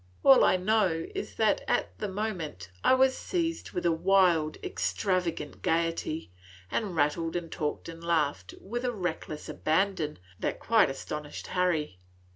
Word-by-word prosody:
All 270 -1 +8
I 185 - +5
know 185 -4 +2
is - - -5
that, 215 -2 +2
at - - 0
the 210 - -2
moment, 180 - -4
I - - +6
was 260 0 +4
seized 335 -2 -2
with 175 - -2
a 170 - +4
wild, 170 -3 +3
extravagant 180 -6 -1
gayety, 165 - -1 0.4
and 200 -6 -1
rattled 160 +2 +1
and 170 -2 -3
talked 150 -1 -3
and 165 0 -9
laughed 145 - 0
with 240 +5 -5
a 250 - +1
reckless 175 -6 -4
abandon 160 -2 0 0.2
that - - -2
quite 225 -8 +4
astonished 150 +2 -6
Harry. 160 - 0
170 Hz, 145 wpm, -29 LUFS, 155-200 Hz, 0.4 s, All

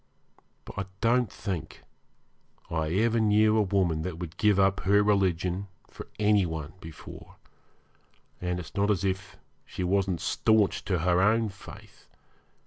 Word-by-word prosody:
But - - -8
I 100 - -2
don't 120 -1 +2
think 95 -8 -6 0.9
I 80 -2 -1
ever 115 +5 +2
knew 110 0 +4
a 110 - +4
woman 90 -5 +1
that 85 0 -5
would 85 -2 -7
give 105 -2 +3
up 95 0 +3
her 100 +2 +3
religion 95 -2 0 0.2
for - - -11
any 105 -1 +3
one 80 -2 -5
before, 80 -1 -11 1.1
and 90 0 -2
it's 80 - -9
not 100 +1 +1
as 100 -2 +1
if 95 0 -3 0.3
she - - -6
wasn't 95 -1 0
staunch 110 -3 +1
to 95 - 0
her 90 0 +3
own 110 +2 +3
faith. 95 -1 -14
95 Hz, 145 wpm, -27 LUFS, 90-105 Hz, 1.1 s, knew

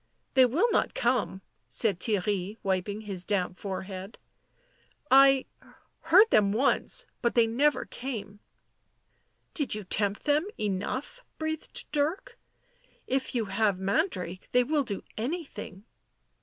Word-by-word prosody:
" - - -46
They 260 -1 +6
will 305 - +2
not - - +1
come," 235 -6 0 0.3
said 190 - +1
Theirry, 205 0 -1
wiping 195 +2 -1
his 195 -4 -4
damp 185 -2 -1
forehead. 190 +1 -6 0.5
" - - -37
I 270 0 +7 0.3
— - - -31
heard 370 +7 +7
them 200 -2 +4
once 255 +7 +2
— - - -46
but 235 - 0
they 235 -1 +6
never 275 +7 +1
came." 240 -6 -5
u 205 +1 -19 1.1
Did 290 -8 -1
you 210 - -5
tempt 200 +2 -1
them 300 +5 +2
enough?" 215 - -3
breathed 315 0 -4
Dirk. 325 +11 -1 0.3
" - - -38 0.3
If 265 0 -2
you 230 -2 +1
have 200 0 +1
Mandrake 190 - -2
they 250 0 +5
will 290 +3 +1
do 205 -6 -4 0.2
anything." 235 - -5
225 Hz, 140 wpm, -28 LUFS, 200-275 Hz, 1.1 s, I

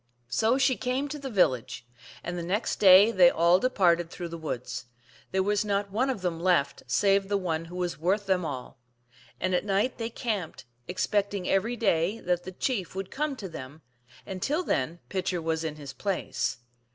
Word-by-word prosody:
So 220 - +2
she 260 -1 +3
came 260 +3 -1
to 295 - -5
the 275 -1 -5
village, 130 - +1 0.4
and 175 - -4
the 175 - -3
next 190 +7 -1
day 195 +2 +8
they 180 -5 +7
all 170 +2 +4
departed 175 -9 +2
through 175 0 -6
the 170 - -6
woods; 125 -5 -5 0.4
there 190 0 +1
was 205 +1 +1
not 200 -1 -1
one 250 +7 +1
of 250 -7 -2
them 170 -2 -1
left 170 -5 +1
save 195 +8 +3
the 205 - +2
one 165 -4 -2
who 175 +2 -10
was 180 -3 -2
worth 195 +5 +1
them 190 -2 +1
all. 130 -7 -6 0.6
And 185 - 0
at 180 - +2
night 205 +6 0
they 225 0 -2
camped, 215 - -4 0.2
expecting 200 0 -1
every 220 +5 +1
day 200 -2 +1
that 175 0 -1
the 185 - -6
chief 190 - -2
would 195 -1 -5
come 295 0 -2
to 205 -6 -6
them, 155 -2 -9 0.4
and 190 -2 -6
till 305 - 0
then 155 - -1
Pitcher 185 -2 -1
was 160 0 -1
in 155 -2 -3
his 145 -3 -9
place. 195 -8 -2
185 Hz, 190 wpm, -28 LUFS, 170-210 Hz, 0.6 s, day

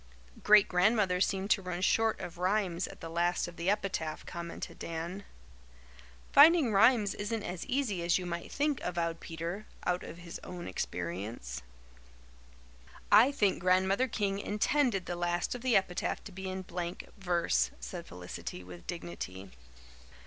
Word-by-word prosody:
"Great 210 -1 +7
Grandmother 185 0 +3
seemed 195 +1 0
to 195 - +4
run 180 -1 -4
short 225 +4 +2
of 170 0 -7
rhymes 185 -2 0
at - - -12
the 165 - -5
last 175 +2 0
of 175 - -10
the 170 +2 -1
epitaph," 190 -6 -1
commented 170 -1 -7
Dan. 170 +4 -5 1.1
"Finding 295 -5 +7
rhymes 215 -1 +5
isn't 210 +1 -3
as 175 0 -5
easy 250 -9 0
as 170 0 +3
you 185 - -4
might 170 -1 -5
think," 290 -2 0
avowed 170 -1 -2
Peter, 170 +6 -5 0.2
out 180 0 +1
of 165 - -8
his 170 -1 -8
own 180 -1 -7
experience. 90 - -4 1.5
"I 225 +7 +8
think 205 -9 +1
Grandmother 190 +7 +3
King 200 -4 -1
intended 210 0 +1
the 175 - -3
last 175 0 -1
of 245 - -6
the 250 -2 +2
epitaph 185 -2 -1
to 210 - -9
be 190 0 -6
in 185 0 -4
blank 175 -1 -5
verse," 175 -3 +1
said 175 -2 -7
Felicity 90 0 -7
with 90 -1 -12
dignity. 100 - -6
180 Hz, 150 wpm, -31 LUFS, 170-205 Hz, 1.5 s, I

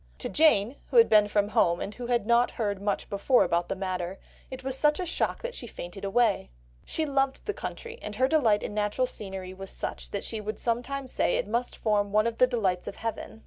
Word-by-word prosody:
To - - -5
Jane, 280 -6 +3
who - - 0
had 460 - +8
been 210 -1 +6
from 205 0 +1
home, 170 -4 +3
and 205 - -4
who 245 +1 -6
had 240 -3 +1
not 235 +2 +4
heard 205 -4 -1
much 205 0 -1
before 205 +6 +3
about 170 +1 0
the 195 - -1
matter, 185 -1 -3 0.3
it 260 0 -8
was 265 0 -1
such 300 +3 +3
a 365 - -1
shock 340 - -1
that - - -3
she 240 - -5
fainted 185 -1 -8
away... 200 - +2 0.4
she 320 - -1
loved 275 -2 0
the 420 - -1
country, 470 +3 -7
and 210 - -6
her 260 +4 +3
delight 240 -9 +3
in - - -4
natural 210 +4 +1
scenery 190 -6 -6
was 195 0 -6
such - - -4
that 200 - -4
she 220 -2 -3
would 215 +1 -4
sometimes 255 +3 -2
say - - +1
it - - -2
must 235 +3 -2
form 205 -2 +1
one 215 +1 +3
of 230 -1 -2
the 255 - +6
delights 195 -8 -1
of - - -5
heaven." 225 -1 -5
220 Hz, 230 wpm, -28 LUFS, 200-260 Hz, 0.4 s, had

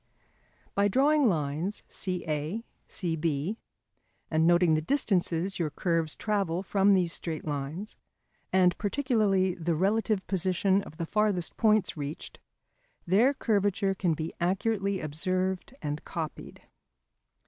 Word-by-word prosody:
By 200 0 +3
drawing 275 +4 +4
lines 160 +4 -2
CA, 175 +2 -3 0.2
CB 165 +1 -1 0.7
and 160 +1 +3
noting 175 -1 +5
the 155 - +2
distances 185 - 0
your 165 -3 0
curves 165 0 0
travel 195 -4 -1
from 195 +1 +3
these 175 -3 +1
straight 160 -3 -4
lines, 150 +7 -4 0.5
and 180 -1 +4
particularly 205 -5 +1
the 170 -1 -1
relative 200 +2 +1
position 190 +1 +1
of 155 - -12
the 170 - -2
farthest 205 -2 0
points 215 -4 +3
reached, 145 +1 -6 0.7
their 210 +10 +4
curvature 200 -4 +1
can 180 -4 0
be 155 +1 -4
accurately 195 +2 0
observed 185 - -2
and 150 +1 -3
copied. 160 -3 -6
185 Hz, 115 wpm, -28 LUFS, 165-205 Hz, 0.7 s, noting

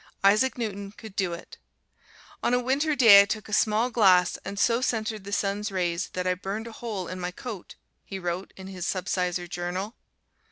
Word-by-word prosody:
Isaac 215 +7 +4
Newton 200 -3 -4
could 215 -2 -12
do 185 -4 0
it. 170 - -10 0.8
"On 245 - +2
a - - +2
Winter 275 +5 +1
day 225 -7 +9
I - - +2
took 215 +1 -4
a 210 - -8
small 220 +4 +2
glass 185 -6 +4
and 200 - -6
so 235 +3 +2
centered 220 -4 -2
the 200 - -7
sun's 205 +1 -1
rays 175 -1 -1
that 180 0 -3
I 185 - +2
burned 200 +4 -5
a 230 - -8
hole 215 -6 -5
in 185 +1 -6
my 180 0 -2
coat," 205 0 -8 0.3
he 195 - -7
wrote 175 +1 -4
in 190 - -9
his 185 -2 -5
subsizar 180 -1 -1
journal. 175 +5 -4
200 Hz, 195 wpm, -26 LUFS, 185-220 Hz, 0.8 s, day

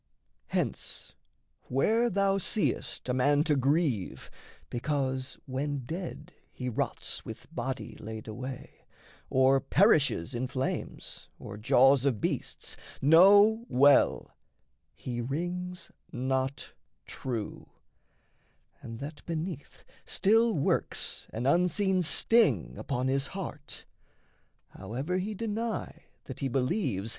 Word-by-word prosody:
Hence, - - -3 0.5
where 225 - +2
thou 195 0 +2
seest 205 - 0
a 125 - 0
man 145 +3 +3
to 150 -2 +2
grieve 135 - 0 0.4
because 130 0 -2
When 135 0 -3
dead 170 +6 -6 0.2
he 125 -1 -4
rots 115 - -2
with - - -10
body 125 -3 -4
laid 110 0 -7
away, 125 +4 -8 0.4
Or 130 +1 +4
perishes 145 - +3
in 125 +2 -2
flames 130 +1 -4
or 105 - -8
jaws 125 +5 +4
of 130 -7 +1
beasts, - - -3 0.2
Know 205 - +6
well: 140 +3 +4 0.6
he 120 -2 -4
rings 175 +7 -4 0.2
not 130 +1 -2 0.3
true, 115 -5 -5 1.1
and 115 0 -8
that 145 +2 -7
beneath 165 -2 -5 0.2
Still 225 +2 +3
works 140 - -1
an 115 +3 -4
unseen 180 +5 +2
sting 225 +7 +3
upon 130 -2 -2
his 135 +1 +1
heart, 160 -7 -7 0.8
However 130 - -3
he 210 +3 -3
deny 225 +2 -4 0.2
that - - -9
he 140 - -1
believes. 125 - -1
140 Hz, 105 wpm, -29 LUFS, 130-180 Hz, 1.1 s, Know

